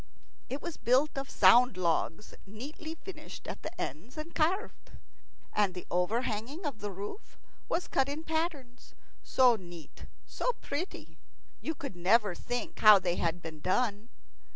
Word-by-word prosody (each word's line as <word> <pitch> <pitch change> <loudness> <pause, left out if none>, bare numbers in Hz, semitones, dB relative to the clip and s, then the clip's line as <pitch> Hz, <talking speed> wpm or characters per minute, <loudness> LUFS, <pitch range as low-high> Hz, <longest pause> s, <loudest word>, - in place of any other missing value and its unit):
It 270 +3 -4
was 345 -2 -5
built 260 +5 +3
of 275 0 -4
sound 245 -4 +6
logs, 170 +2 0
neatly 290 +10 -7
finished 375 +4 -10
at - - -6
the 330 +3 -7
ends 175 - -5
and 310 +2 -6
carved. 365 +7 -1 0.6
And 200 -3 +2
the 180 - -6
overhanging 225 - -1
of 275 -7 -3
the 205 0 -4
roof 200 - -8 0.3
was 345 - 0
cut 270 0 +1
in 300 +3 -4
patterns, 315 -7 -3 0.3
so 250 -2 +5
neat, 175 -5 -11 0.2
so - - -1
pretty, 330 +1 -6 0.4
you 320 - -2
could 275 -10 -6
never 200 +3 +3
think 245 +7 -4
how 215 -1 +10
they 180 -2 -1
had 170 +1 -1
been 160 -2 -7
done. 210 +5 0
245 Hz, 150 wpm, -31 LUFS, 190-305 Hz, 0.6 s, how